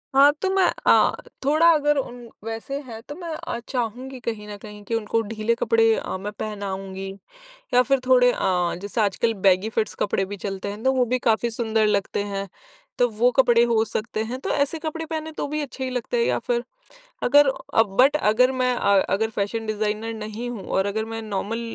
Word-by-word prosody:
हाँ, 280 +2 +8
तो 385 - +1
मैं 385 -1 +4 0.2
अ, - - +5 0.3
थोड़ा 310 +4 +4
अगर 295 -1 +2
उन 255 -3 -3 0.3
वैसे 225 +5 -4
है 225 -2 -7
तो 290 +5 -9
मैं 345 +1 -8
अ, 235 - -5
चाहूँगी 250 +1 -3
कहीं 220 -3 -5
न 205 -1 -7
कहीं 210 -1 -10
कि 230 - -2
उनको 225 0 0
ढीले 220 +1 0
कपड़े 455 - +3
अ, 465 - -4
मैं 200 +2 -5
पहनाऊँगी 195 -2 -5 0.7
या 250 - +7
फ़िर 270 +1 +1
थोड़े 250 -1 +6
अ, 180 -5 0
जैसे 205 +3 -2
आजकल 215 +2 +1
बेगी 190 +2 +4
फिट्स 220 -1 -1
कपड़े 195 -1 0
भी 205 +2 -6
चलते 195 0 -5
हैं। 205 +2 -8
तो 265 - +4
वो 255 -1 +2
भी 255 +2 0
काफ़ी 235 0 +1
सुंदर 225 -1 +1
लगते 200 -1 0
हैं 200 -1 -4 0.5
तो 245 - +4
वो 230 +2 +2
कपड़े 240 -3 +5
हो 230 -2 +2
सकते 215 0 -3
हैं। 250 +3 -5
तो - - -4
ऐसे 285 +3 0
कपड़े 320 +1 -4
पहने 315 0 -4
तो - - -3
भी 300 +1 -2
अच्छे 270 -2 -6
ही 260 - -3
लगते 250 - -2
हैं 470 - +3
या - - +1
फ़िर 240 0 -1 0.6
अगर 290 +2 +6 0.3
अ, 225 - +7
बट 250 +8 +3
अगर 250 0 +3
मैं 255 -1 +1
अ, 200 -4 +3
अगर 220 +3 +1
फैशन 220 +2 -2
डिज़ाइनर 215 +1 -2
नहीं 215 +2 -5
हूँ 215 -6 -7
और 190 +1 0
अगर 215 +2 -1
मैं 225 - -3
नॉर्मल 215 +2 -3
225 Hz, 205 wpm, -23 LUFS, 210-260 Hz, 0.7 s, हाँ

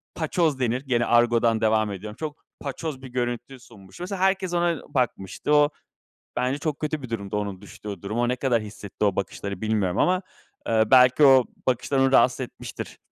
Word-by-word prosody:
paçoz 160 -3 0
denir, 125 +1 0
gene 125 -4 0
argodan 120 -1 +3
devam 110 -1 +2
ediyorum. 105 +2 -7
Çok 155 -2 -6 0.2
paçoz 140 0 -5
bir 135 - -8
görüntü 120 +1 -4
sunmuş. 100 -6 -16
Mesela 185 +1 -4
herkes 190 -2 +1
ona 170 -2 +1
bakmıştı. 125 +1 -1
O 145 0 +5 0.7
bence 130 +3 0
çok 150 -1 -3
kötü 155 -1 -3
bir 130 - -8
durumdu, 100 -3 -3
onun 100 -3 -3
düştüğü 100 -2 -9
durum. 105 +4 -3
O 120 0 +2
ne 125 - 0
kadar 120 -4 +1
hissetti 100 0 -6
o 100 -3 +2
bakışları 100 0 -4
bilmiyorum 105 -4 0
ama, 185 +1 +2 0.4
eee, 110 -1 +3
belki 130 +2 +6
o 135 -2 +7 0.2
bakışlar 130 +2 0
onu 135 0 +3
rahatsız 125 +1 +4
etmiştir. 125 - -7
125 Hz, 180 wpm, -25 LUFS, 110-140 Hz, 0.7 s, o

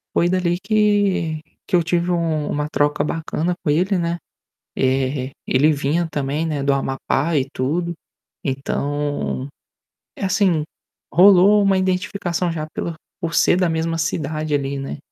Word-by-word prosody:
foi 175 - +3
dali 175 -1 +1
que 200 -6 +1 0.2
que - - 0
eu 175 - +5
tive 170 +1 0
um 165 -3 0
uma 150 0 -2
troca 145 -1 +1
bacana 165 +2 -2
com 160 - -1
ele, 185 +6 +2
né, 170 0 -1 0.6
eh, 130 0 0
ele 145 +4 +4
vinha 150 +4 0
também, 145 +2 -1
né, 150 -3 -2
do 140 - +2
Amapá 140 +4 0
e 135 -2 +1
tudo. 170 +7 -1 0.5
Então, 145 0 -2 0.7
é - - -4
assim, 185 -5 +2 0.5
rolou 195 +4 +7
uma 195 -1 +3
identificação 180 -2 -1
já 155 -2 -4
pela 170 - -3 0.3
por 165 -1 -3
ser 160 - +4
da 180 -1 +2
mesma 165 0 -1
cidade 155 -1 -2
ali, 140 -1 -1
né. 135 +1 -5
160 Hz, 145 wpm, -21 LUFS, 145-180 Hz, 0.7 s, rolou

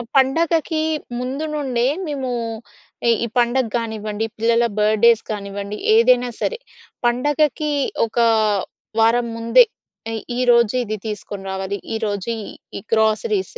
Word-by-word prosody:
పండగకి 320 +4 +2 0.4
ముందు 265 +5 -3
నుండే 260 -5 0 0.2
మేమూ, 275 -5 -3 0.8
ఇ - - +5 0.2
ఈ - - -3
పండగ 245 +2 +3
గానివ్వండి, 220 -2 -2
పిల్లల 230 +1 +3
బర్త్డేస్ 215 +2 +4
కానివ్వండి. 200 0 -5 0.2
ఏదైనా 245 +2 +4
సరే, 475 - -1 0.5
పండగకి 295 +5 +1 0.4
ఒక 220 - -14 0.8
వారం 235 +2 +3
ముందే 230 - +6 0.5
ఎ - - -3 0.2
ఈరోజు 235 -3 +4
ఇది 215 -2 -3
తీసుకొని 205 -2 -6
రావాలి, 190 +1 -3 0.2
ఈరోజు 210 -2 -2 0.5
ఈ - - -4
గ్రోసరీస్, 225 - +1
235 Hz, 110 wpm, -20 LUFS, 215-265 Hz, 0.8 s, ముందే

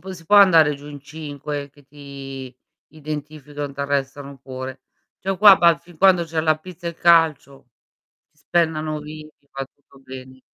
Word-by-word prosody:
non - - -6
si 165 -2 -14
può 205 - +2
andare 165 -7 +6
giù 140 +1 -13
in 145 -1 -9
5 145 -1 -7
che 145 0 -22
ti 135 -2 -10 0.4
identificano 150 -1 -7
e - - -15
ti 140 - -7
arrestano 140 0 -3
pure. 130 +1 -8 0.4
Cioè 195 - -3
oh 195 - -1
qua 205 -1 +9
ba 170 -3 +4
fin 175 -2 -19
quando 185 -1 +4
c'è 165 -1 -2
la 155 -1 +1
pizza 175 +1 -11
e - - -2
il 170 - -16
calcio 155 -6 +2 0.6
si 150 - -41
spennano 155 -1 -1
vivi, 155 +1 -10 0.2
va 135 0 -5
tutto 140 0 -24
bene. 130 0 -12
150 Hz, 180 wpm, -21 LUFS, 140-160 Hz, 0.6 s, qua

